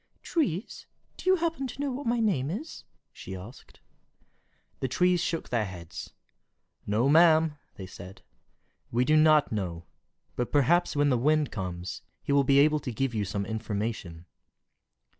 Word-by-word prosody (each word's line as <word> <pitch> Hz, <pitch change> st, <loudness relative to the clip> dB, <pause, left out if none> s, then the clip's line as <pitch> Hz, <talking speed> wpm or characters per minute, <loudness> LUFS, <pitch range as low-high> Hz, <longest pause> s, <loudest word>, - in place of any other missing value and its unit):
"Trees, 220 Hz, -, -2 dB, 0.3 s
do -, -, -2 dB
you 375 Hz, -, +6 dB
happen 330 Hz, -6 st, -2 dB
to 255 Hz, -, -10 dB
know 285 Hz, -1 st, -1 dB
what 260 Hz, +1 st, -5 dB
my 235 Hz, +1 st, +1 dB
name 180 Hz, -, +1 dB
is?" 245 Hz, -, -6 dB, 0.3 s
she 95 Hz, -, -8 dB
asked. 105 Hz, +8 st, -12 dB, 1.0 s
The 130 Hz, -, -1 dB
trees 180 Hz, +5 st, +2 dB
shook 165 Hz, -1 st, -2 dB
their 115 Hz, -3 st, 0 dB
heads. 90 Hz, -3 st, -8 dB, 0.8 s
"No, 110 Hz, +5 st, +2 dB
ma'am," 160 Hz, 0 st, +5 dB, 0.2 s
they 95 Hz, -, -8 dB
said, 95 Hz, 0 st, -11 dB, 0.7 s
"we 120 Hz, +2 st, +1 dB
do 155 Hz, -, +3 dB
not 155 Hz, -1 st, +5 dB
know; 90 Hz, -5 st, -3 dB, 0.5 s
but 125 Hz, -, -2 dB
perhaps 150 Hz, +5 st, +3 dB
when 145 Hz, 0 st, +3 dB
the 125 Hz, -, +2 dB
Wind 150 Hz, +2 st, +2 dB
comes, 90 Hz, -3 st, -5 dB, 0.2 s
he -, -, -3 dB
will 140 Hz, 0 st, +4 dB
be 135 Hz, +1 st, +3 dB
able 150 Hz, +2 st, +5 dB
to 130 Hz, -, -5 dB
give 125 Hz, +2 st, -1 dB
you 105 Hz, -2 st, 0 dB
some 100 Hz, 0 st, -3 dB
information." 105 Hz, -5 st, -4 dB
140 Hz, 160 wpm, -28 LUFS, 105-170 Hz, 1.0 s, you